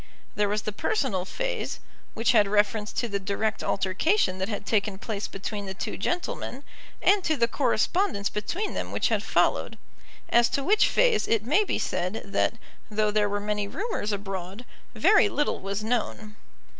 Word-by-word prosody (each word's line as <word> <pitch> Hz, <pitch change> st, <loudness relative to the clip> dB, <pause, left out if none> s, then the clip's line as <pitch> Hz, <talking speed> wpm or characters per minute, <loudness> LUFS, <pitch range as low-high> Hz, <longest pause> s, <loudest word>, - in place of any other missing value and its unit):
There 205 Hz, -1 st, +1 dB
was 210 Hz, 0 st, -1 dB
the 215 Hz, -, -2 dB
personal 205 Hz, -, -1 dB
phase, -, -, -3 dB, 0.4 s
which 225 Hz, -, +3 dB
had 210 Hz, -4 st, +5 dB
reference 210 Hz, +1 st, +1 dB
to 240 Hz, -, -1 dB
the 200 Hz, -2 st, -2 dB
direct 200 Hz, +3 st, -2 dB
altercation 190 Hz, -, +1 dB
that 190 Hz, +2 st, -2 dB
had 205 Hz, -, -4 dB
taken 205 Hz, -2 st, 0 dB
place 210 Hz, 0 st, -4 dB
between 200 Hz, +1 st, -5 dB
the 190 Hz, -, -5 dB
two -, -, -4 dB
gentlemen, 345 Hz, -, -3 dB, 0.4 s
and 405 Hz, -2 st, +4 dB
to 315 Hz, -3 st, +1 dB
the 235 Hz, -, +3 dB
correspondence 255 Hz, -, +1 dB
between 345 Hz, -, -3 dB
them -, -, -4 dB
which -, -, +1 dB
had -, -, +1 dB
followed, -, -, +1 dB, 0.5 s
as 235 Hz, 0 st, +5 dB
to 275 Hz, -, -2 dB
which 425 Hz, +7 st, +4 dB
phase -, -, +3 dB
it 225 Hz, -2 st, +1 dB
may 320 Hz, -, +4 dB
be -, -, -1 dB
said 185 Hz, +5 st, -2 dB
that 200 Hz, +3 st, 0 dB, 0.3 s
though 215 Hz, 0 st, +1 dB
there 210 Hz, -1 st, +2 dB
were 205 Hz, 0 st, -1 dB
many 210 Hz, 0 st, -2 dB
rumours 390 Hz, -, -3 dB
abroad, 195 Hz, +2 st, -5 dB, 0.3 s
very -, -, +5 dB
little 295 Hz, -6 st, 0 dB
was 200 Hz, +2 st, -3 dB
known. 220 Hz, -2 st, -2 dB
215 Hz, 170 wpm, -26 LUFS, 200-275 Hz, 0.5 s, had